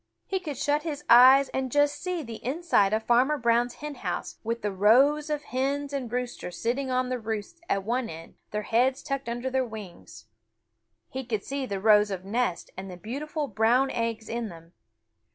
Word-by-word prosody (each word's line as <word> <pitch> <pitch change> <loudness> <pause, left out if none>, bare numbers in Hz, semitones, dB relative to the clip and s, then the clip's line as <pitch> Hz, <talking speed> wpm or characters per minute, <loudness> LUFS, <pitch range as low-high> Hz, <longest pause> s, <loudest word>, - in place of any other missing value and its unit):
He 380 - -1
could 300 -7 -6
shut 290 +2 +1
his 300 -2 -5
eyes 260 +3 +8
and 260 -1 -3
just 290 +1 +2
see 360 -3 -2
the 230 -3 -9
inside 260 - +2
of 220 +1 0
Farmer 255 +6 +3
Brown's 240 -1 +1
hen 300 0 -6
house 185 -9 -5
with 230 0 -3
the 205 - 0
rows 265 +10 +4
of 300 -1 -2
hens 280 +2 -2
and 255 -5 -3
roosters 245 -8 -4
sitting 260 +4 -1
on 255 0 0
the 255 -1 -2
roosts 220 +9 -5
at 195 -1 +1
one 240 +3 -1
end, 165 +1 -10 0.2
their 210 0 -3
heads 250 +5 +1
tucked 275 -3 -3
under 240 +2 -3
their 260 0 +2
wings. 195 - -10 0.8
He 265 +1 -5
could 220 -4 -3
see 275 -1 -3
the 200 -3 -3
rows 210 0 +5
of 190 -1 -5
nests 205 -4 -1
and 190 +1 -7
the 180 - -8
beautiful 290 - -4
brown 240 +5 +2
eggs 230 -2 -2
in 235 -1 -3
them. 165 0 -13
245 Hz, 190 wpm, -27 LUFS, 215-275 Hz, 0.8 s, eyes